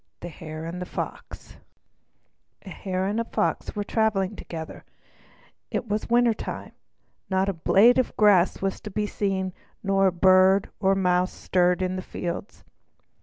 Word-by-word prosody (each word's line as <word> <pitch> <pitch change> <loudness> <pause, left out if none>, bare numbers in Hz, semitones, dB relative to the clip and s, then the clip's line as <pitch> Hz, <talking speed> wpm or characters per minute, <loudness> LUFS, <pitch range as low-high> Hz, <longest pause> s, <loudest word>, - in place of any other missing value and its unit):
The 175 - -6
Hare 155 0 -8
and 175 +2 -6
the 180 - -5
Fox - - -7 1.1
A - - -10
hare 185 -2 -3
and 205 +3 -1
a - - +1
Fox 230 - -2
were 205 - -1
traveling 210 -2 0
together. 160 -4 -8 0.9
It 235 - -3
was 210 0 -2
winter 240 -1 +4
time. - - -7 0.6
Not 190 0 +1
a - - -1
blade 210 +9 +4
of 255 - -1
grass 195 -4 +4
was 195 -1 -2
to 210 - -7
be 210 +1 -2
seen, 190 -3 -2 0.3
not 195 -1 +3
a - - +3
bird 185 +2 +4
or 195 0 +3
mouse 180 -1 +1
stirred 180 0 +1
in 185 0 -2
the - - -3
fields. 175 +2 -6
190 Hz, 160 wpm, -25 LUFS, 180-205 Hz, 1.1 s, winter